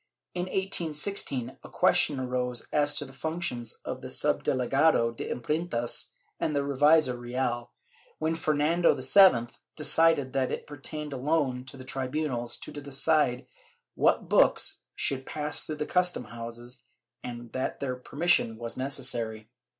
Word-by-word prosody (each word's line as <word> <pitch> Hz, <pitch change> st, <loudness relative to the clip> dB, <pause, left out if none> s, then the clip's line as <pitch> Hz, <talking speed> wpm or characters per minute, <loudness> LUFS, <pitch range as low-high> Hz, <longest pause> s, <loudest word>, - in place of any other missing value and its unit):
In 180 Hz, 0 st, -2 dB
1816 170 Hz, -7 st, -1 dB
a -, -, -11 dB
question 140 Hz, -3 st, +2 dB
arose 125 Hz, -1 st, -2 dB
as 145 Hz, -1 st, +3 dB
to 145 Hz, -, -3 dB
the 135 Hz, -, -13 dB
functions 155 Hz, -5 st, -3 dB
of -, -, -5 dB
the -, -, -7 dB
suhdelegado 130 Hz, -2 st, +2 dB
de -, -, -5 dB
Imprentas 125 Hz, -2 st, -2 dB, 0.3 s
and 150 Hz, -, -1 dB
the 140 Hz, -, +2 dB
revisor 145 Hz, 0 st, +4 dB
Real, 120 Hz, -1 st, -2 dB, 0.5 s
when 160 Hz, +1 st, 0 dB
Fernando 160 Hz, +1 st, +2 dB
VII 130 Hz, -3 st, +6 dB, 0.2 s
decided 155 Hz, -3 st, +2 dB
that 130 Hz, -1 st, 0 dB
it -, -, -4 dB
pertained 150 Hz, +1 st, -6 dB
alone 135 Hz, -2 st, 0 dB
to 135 Hz, -, -10 dB
the 130 Hz, -, -10 dB
tribunals 130 Hz, -2 st, -2 dB
to -, -, -9 dB
decide 145 Hz, -2 st, +1 dB, 0.5 s
what -, -, +2 dB
books -, -, +3 dB
should 135 Hz, -1 st, 0 dB
pass 150 Hz, +2 st, -3 dB
through 155 Hz, -, -5 dB
the 150 Hz, 0 st, -3 dB
custom 180 Hz, -5 st, +1 dB
houses, 120 Hz, +2 st, -8 dB, 0.4 s
and 120 Hz, -1 st, -7 dB
that 130 Hz, -, -3 dB
their 130 Hz, -2 st, -2 dB
permission 135 Hz, -3 st, +1 dB
was 115 Hz, 0 st, -5 dB
necessary. 115 Hz, -4 st, -2 dB
135 Hz, 135 wpm, -28 LUFS, 125-155 Hz, 0.5 s, VII